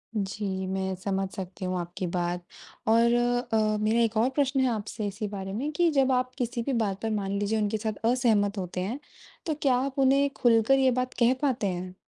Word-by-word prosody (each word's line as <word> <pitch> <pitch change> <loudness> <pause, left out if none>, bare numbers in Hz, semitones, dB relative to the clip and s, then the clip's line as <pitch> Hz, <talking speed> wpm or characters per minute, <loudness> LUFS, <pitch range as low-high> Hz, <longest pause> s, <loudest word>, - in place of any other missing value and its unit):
जी 195 -1 -2
मैं 190 0 -2
समझ 195 +1 -2
सकती 190 0 -6
हूँ 185 0 -1
आपकी 175 +1 -4
बात 175 0 -2 0.4
और 230 +1 +4 0.4
अ, 215 -1 +2
मेरा 220 +2 +2
एक 230 -1 +1
और 235 +4 +3
प्रश्न 275 -1 +1
है 260 - +3
आपसे 215 -1 -3
इसी 205 +2 -4
बारे 195 -1 -6
में 280 +8 -2
कि 340 +2 +2
जब 270 -2 +3
आप 255 0 +1
किसी 245 -1 -2
भी 275 - -2
बात 205 -4 -1
पर 225 - -1
मान 200 -2 -2
लीजिए 205 +2 0
उनके 210 +1 0
साथ 215 0 -4
असहमत 215 -5 +2
होते 180 -1 -3
हैं, 230 +9 -3 0.5
तो 315 - 0
क्या 265 -3 +3
आप 265 +2 -2
उन्हें 275 +1 +4
खुलकर 235 +3 +4
ये 265 -1 +4
बात 255 0 -4
कह 240 +1 +5
पाते 255 -8 +1
हैं? 180 0 -4
220 Hz, 210 wpm, -27 LUFS, 195-255 Hz, 0.5 s, कह